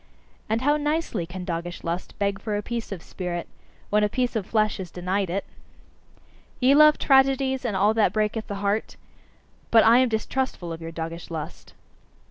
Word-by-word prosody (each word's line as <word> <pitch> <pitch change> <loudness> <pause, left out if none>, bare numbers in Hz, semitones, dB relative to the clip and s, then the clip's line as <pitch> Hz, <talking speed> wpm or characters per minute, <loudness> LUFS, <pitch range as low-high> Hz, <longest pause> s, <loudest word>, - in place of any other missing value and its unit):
And 225 +3 0
how 295 +2 +3
nicely 295 - -1
can 180 +1 -7
doggish 175 0 -4
lust 170 +2 -4
beg 200 -1 -1
for 210 -2 -2
a 205 - -3
piece 235 -1 -4
of 185 -4 -6
spirit, 175 -2 -5 0.4
when 210 0 +3
a 210 - +2
piece 250 +2 -1
of 210 -4 -2
flesh 215 -1 +1
is 185 -2 -5
denied 185 +2 -2
it! 195 +3 -2 1.1
Ye 260 +1 +5
love 305 +1 +7
tragedies 265 -1 +3
and 225 -5 -2
all 205 +3 +3
that 220 -1 +3
breaketh 215 +1 -1
the 200 - -4
heart? 205 +2 -1 0.7
But 225 -1 +6
I 230 +2 +7
am 255 -1 +3
distrustful 220 -5 -2
of 165 - -8
your 165 0 -6
doggish 165 +1 -6
lust. 160 -3 -7
210 Hz, 180 wpm, -25 LUFS, 180-250 Hz, 1.1 s, love